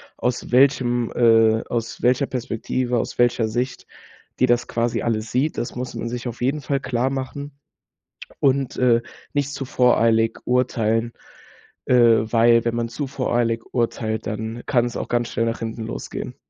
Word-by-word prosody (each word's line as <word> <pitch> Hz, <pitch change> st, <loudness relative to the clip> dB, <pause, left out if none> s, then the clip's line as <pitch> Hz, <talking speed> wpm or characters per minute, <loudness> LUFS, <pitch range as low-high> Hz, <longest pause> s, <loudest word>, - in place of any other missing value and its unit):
aus 125 Hz, 0 st, -2 dB
welchem 125 Hz, -2 st, +3 dB
äh, 115 Hz, -2 st, +4 dB
aus 115 Hz, -1 st, -4 dB
welcher 125 Hz, +2 st, +3 dB
Perspektive, 125 Hz, 0 st, -2 dB
aus -, -, -4 dB
welcher 120 Hz, -2 st, +2 dB
Sicht 125 Hz, +4 st, -3 dB, 0.5 s
die -, -, +5 dB
das 120 Hz, -1 st, +1 dB
quasi 115 Hz, 0 st, -1 dB
alles 115 Hz, -1 st, -2 dB
sieht. 140 Hz, +5 st, 0 dB
Das 120 Hz, -, -4 dB
muss 125 Hz, -1 st, -5 dB
man 115 Hz, -, -4 dB
sich 120 Hz, +1 st, -4 dB
auf 120 Hz, 0 st, -7 dB
jeden 140 Hz, +4 st, 0 dB
Fall 140 Hz, 0 st, -1 dB
klar 130 Hz, -1 st, -1 dB
machen 135 Hz, +2 st, -5 dB, 0.9 s
und, 135 Hz, -2 st, +1 dB
äh, 120 Hz, -2 st, +3 dB, 0.3 s
nicht 145 Hz, -1 st, 0 dB
zu 135 Hz, -, -4 dB
voreilig 115 Hz, -3 st, +3 dB
urteilen, 115 Hz, -2 st, +1 dB, 0.7 s
äh, -, -, +2 dB, 0.4 s
weil, 115 Hz, 0 st, +5 dB
wenn 115 Hz, -1 st, 0 dB
man 120 Hz, 0 st, -1 dB
zu 130 Hz, +5 st, -4 dB
voreilig 120 Hz, -4 st, -1 dB
urteilt, 110 Hz, -2 st, -1 dB
dann 110 Hz, +2 st, -4 dB
kann 120 Hz, -4 st, +2 dB
es 120 Hz, -, -5 dB
auch -, -, -3 dB
ganz 120 Hz, 0 st, 0 dB
schnell 115 Hz, -1 st, -1 dB
nach 115 Hz, 0 st, -2 dB
hinten 115 Hz, 0 st, -4 dB
losgehen. -, -, -6 dB
120 Hz, 165 wpm, -22 LUFS, 115-130 Hz, 0.9 s, die